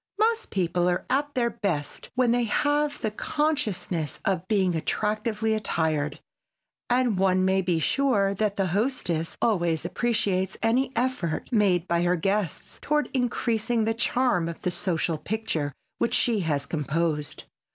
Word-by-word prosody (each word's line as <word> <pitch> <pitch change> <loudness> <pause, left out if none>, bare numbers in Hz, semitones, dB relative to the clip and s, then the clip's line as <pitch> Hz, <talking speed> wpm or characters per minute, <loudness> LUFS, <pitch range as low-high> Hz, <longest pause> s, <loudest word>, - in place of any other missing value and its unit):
Most 450 +2 +1
people 180 -1 +1
are 175 - -1
at 285 +2 0
their 235 -2 +1
best 185 -10 -3
when 250 -2 +3
they 240 0 +2
have 290 +5 +1
the 220 - -1
consciousness 210 - -1
of 185 -2 0
being 190 -4 +2
attractively 215 +5 -1
attired, 160 -7 -1 0.7
and 245 -5 +2
one 185 -1 +3
may 190 0 +3
be 175 -3 +1
sure 205 - +2
that 205 0 0
the 195 - +1
hostess 195 -8 -1
always 175 -7 +1
appreciates 195 -3 0
any 245 +4 +2
effort 230 -10 -1
made 190 -6 +3
by 170 0 +1
her 175 +1 +2
guests 195 0 -2
toward 300 0 0
increasing 240 -2 0
the 225 +1 +1
charm 230 -7 +1
of 170 - -8
the 180 - 0
social 170 -3 -1
picture 185 -9 -2 0.3
which - - +1
she 230 -3 +2
has 150 -6 -1
composed. 155 -1 -2
200 Hz, 145 wpm, -26 LUFS, 170-240 Hz, 0.7 s, when